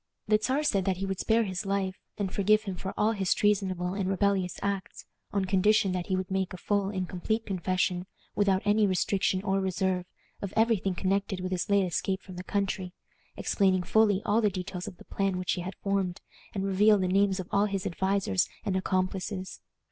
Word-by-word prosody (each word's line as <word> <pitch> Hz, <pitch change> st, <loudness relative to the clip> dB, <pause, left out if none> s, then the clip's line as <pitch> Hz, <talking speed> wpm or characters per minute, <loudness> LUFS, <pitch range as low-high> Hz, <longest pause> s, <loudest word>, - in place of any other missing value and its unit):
The 215 Hz, 0 st, +4 dB
Czar 270 Hz, +6 st, +1 dB
said 195 Hz, -10 st, +1 dB
that 190 Hz, -2 st, +1 dB
he 195 Hz, -, -2 dB
would 195 Hz, -1 st, -3 dB
spare 230 Hz, +1 st, +3 dB
his 185 Hz, -2 st, -3 dB
life, 195 Hz, -1 st, -1 dB, 0.2 s
and 195 Hz, -3 st, -2 dB
forgive 215 Hz, +2 st, +3 dB
him 195 Hz, -3 st, -4 dB
for 190 Hz, +2 st, -5 dB
all 215 Hz, +1 st, +3 dB
his 195 Hz, -4 st, +1 dB
treasonable 190 Hz, -3 st, +1 dB
and 195 Hz, -1 st, -1 dB
rebellious 195 Hz, -2 st, +1 dB
acts, 200 Hz, -1 st, -3 dB, 0.3 s
on 200 Hz, -1 st, 0 dB
condition 200 Hz, +2 st, +3 dB
that 180 Hz, -1 st, -2 dB
he 190 Hz, -, +1 dB
would 185 Hz, 0 st, -3 dB
make 190 Hz, -1 st, -1 dB
a -, -, -6 dB
full 200 Hz, +1 st, 0 dB
and 185 Hz, -3 st, -2 dB
complete 220 Hz, +6 st, -2 dB
confession, 185 Hz, -1 st, -1 dB, 0.3 s
without 195 Hz, -2 st, +2 dB
any 210 Hz, 0 st, +4 dB
restriction 190 Hz, 0 st, +1 dB
or 195 Hz, -1 st, +1 dB
reserve, 185 Hz, -1 st, -1 dB, 0.3 s
of 200 Hz, -1 st, -4 dB
every 225 Hz, 0 st, +4 dB
thing 190 Hz, 0 st, -2 dB
connected 195 Hz, +1 st, 0 dB
with 185 Hz, 0 st, -4 dB
his 180 Hz, +1 st, -1 dB
late 200 Hz, -1 st, +4 dB
escape 190 Hz, +2 st, -1 dB
from 185 Hz, -, -10 dB
the 180 Hz, -, -5 dB
country, 190 Hz, -2 st, -2 dB, 0.4 s
explaining 190 Hz, -3 st, +2 dB
fully 210 Hz, -1 st, +3 dB
all 215 Hz, +3 st, +3 dB
the 210 Hz, -, +3 dB
details 185 Hz, -1 st, -5 dB
of 180 Hz, -, -8 dB
the -, -, -15 dB
plan 195 Hz, -2 st, -1 dB
which 180 Hz, -1 st, -1 dB
he 180 Hz, -, -1 dB
had 185 Hz, +2 st, -6 dB
formed, 195 Hz, -3 st, -1 dB, 0.4 s
and 195 Hz, -1 st, -1 dB
reveal 205 Hz, +2 st, +5 dB
the 185 Hz, -2 st, 0 dB
names 195 Hz, +1 st, +2 dB
of 180 Hz, -, -4 dB
all 200 Hz, +1 st, +3 dB
his 195 Hz, -2 st, -3 dB
advisers 190 Hz, -, +1 dB, 0.2 s
and 195 Hz, -3 st, 0 dB
accomplices. 185 Hz, +1 st, -2 dB
195 Hz, 205 wpm, -29 LUFS, 185-200 Hz, 0.4 s, reveal